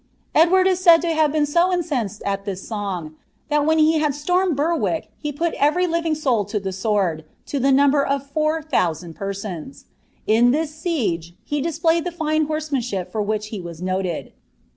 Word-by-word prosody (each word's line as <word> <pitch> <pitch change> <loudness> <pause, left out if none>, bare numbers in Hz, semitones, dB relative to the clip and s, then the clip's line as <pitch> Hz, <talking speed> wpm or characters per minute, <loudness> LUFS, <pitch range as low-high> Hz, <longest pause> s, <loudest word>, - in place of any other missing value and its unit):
Edwan) 350 +4 +5
In 330 -5 +4 0.3
incensed 250 - -2
at 195 0 -1
this 195 -2 -6
song, 185 -8 -4 0.3
ihal 295 0 +3
when 320 0 +3
iie 315 0 +4
bod 300 -2 +1
slonneil 355 +4 +1
Btmriek 320 +2 0
he 295 - -3
puc 330 +4 -2
everr 350 +6 +3
living 335 -2 0
soul 260 -8 +1
to 210 +1 -2
the 190 -1 -4
sword, 190 -5 0 0.2
to 280 - -3
the 270 +2 +3
number 280 +1 +4
of 275 0 -1
four 310 +2 -1
thonssnd 175 - -1
persons, 195 - -6 0.4
in 230 +3 +4
this 305 +3 0
siege 225 - -2
he 290 -1 -2
tUspIayed 330 +1 +1
the 355 - -3
fine 310 -2 0
horsemanship 275 - -3
for 220 - -1
which 210 0 -2
he 210 -4 -5
was 170 -2 -8
noted. 185 -2 -3
280 Hz, 165 wpm, -22 LUFS, 200-315 Hz, 0.4 s, Edwan